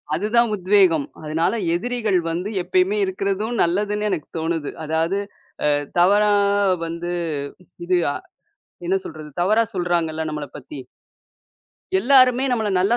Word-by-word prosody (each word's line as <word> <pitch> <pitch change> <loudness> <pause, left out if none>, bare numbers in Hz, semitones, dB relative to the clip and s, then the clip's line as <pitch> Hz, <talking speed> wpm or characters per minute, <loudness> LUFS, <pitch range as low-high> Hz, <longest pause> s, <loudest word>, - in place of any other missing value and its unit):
அதுதான் 220 +6 +2
உத்வேகம். 185 -6 +3 0.2
அதனால 155 +5 0 0.2
எதிரிகள் 220 +1 0
வந்து 180 +5 -3
எப்பயுமே 370 - +1
இருக்கறதும் 215 - -2
நல்லதுன்னு 210 +4 +1
எனக்கு 175 -7 -3
தோணுது. 160 -2 -2 0.2
அதாவது 160 +4 0 0.5
அ - - +4 0.3
தவறா 205 +4 +4 0.5
வந்து, 170 +1 -4 0.8
இது 180 0 +2 0.2
அ - - -5 0.7
என்ன 190 +2 +2
சொல்றது? 155 -1 -9
தவறா 215 +6 +3
சொல்றாங்கள்ல 170 -3 -1
நம்மள 150 -1 -5
பத்தி. 145 - -10 1.2
எல்லாருமே 255 +3 +5
நம்மள 220 -4 0
நல்லா 200 +6 +2
190 Hz, 115 wpm, -21 LUFS, 165-215 Hz, 1.2 s, எல்லாருமே